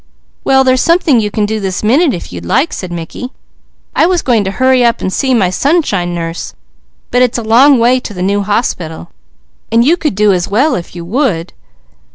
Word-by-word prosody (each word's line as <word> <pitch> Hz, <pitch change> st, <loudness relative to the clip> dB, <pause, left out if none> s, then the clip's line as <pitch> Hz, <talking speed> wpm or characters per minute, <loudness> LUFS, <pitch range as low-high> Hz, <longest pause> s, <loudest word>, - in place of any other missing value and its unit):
"Well 265 Hz, 0 st, +3 dB
there's 255 Hz, -1 st, +2 dB
something 335 Hz, -7 st, +3 dB
you 210 Hz, -1 st, -1 dB
can 210 Hz, 0 st, -1 dB
do 215 Hz, +1 st, -2 dB
this 190 Hz, -1 st, -3 dB
minute 275 Hz, +8 st, +3 dB
if 175 Hz, -, -7 dB
you'd 85 Hz, -1 st, -7 dB
like," 285 Hz, -, 0 dB
said 185 Hz, -2 st, -6 dB
Mickey. 175 Hz, +9 st, -6 dB, 0.7 s
"I 325 Hz, -, +3 dB
was 360 Hz, -2 st, 0 dB
going 235 Hz, -5 st, +2 dB
to -, -, -1 dB
hurry 260 Hz, +5 st, +2 dB
up 235 Hz, 0 st, +2 dB
and 190 Hz, -, -3 dB
see 265 Hz, -2 st, +1 dB
my 190 Hz, -6 st, +1 dB
Sunshine 200 Hz, -, 0 dB
Nurse, 165 Hz, 0 st, -5 dB, 0.6 s
but 250 Hz, -, +2 dB
it's 250 Hz, -1 st, +2 dB
a 235 Hz, -, -4 dB
long 255 Hz, +6 st, +5 dB
way 245 Hz, +2 st, +3 dB
to 225 Hz, -, -8 dB
the 180 Hz, -, -3 dB
new 200 Hz, +2 st, 0 dB
hospital, 180 Hz, -6 st, -3 dB, 0.6 s
and 230 Hz, +1 st, +3 dB
you 335 Hz, +5 st, +3 dB
could 305 Hz, -, -2 dB
do 210 Hz, 0 st, +3 dB
as 175 Hz, -1 st, -1 dB
well, 255 Hz, +9 st, +1 dB
if 175 Hz, -3 st, -5 dB
you 170 Hz, -1 st, -7 dB
would." 195 Hz, -, -1 dB
225 Hz, 210 wpm, -13 LUFS, 185-260 Hz, 0.7 s, long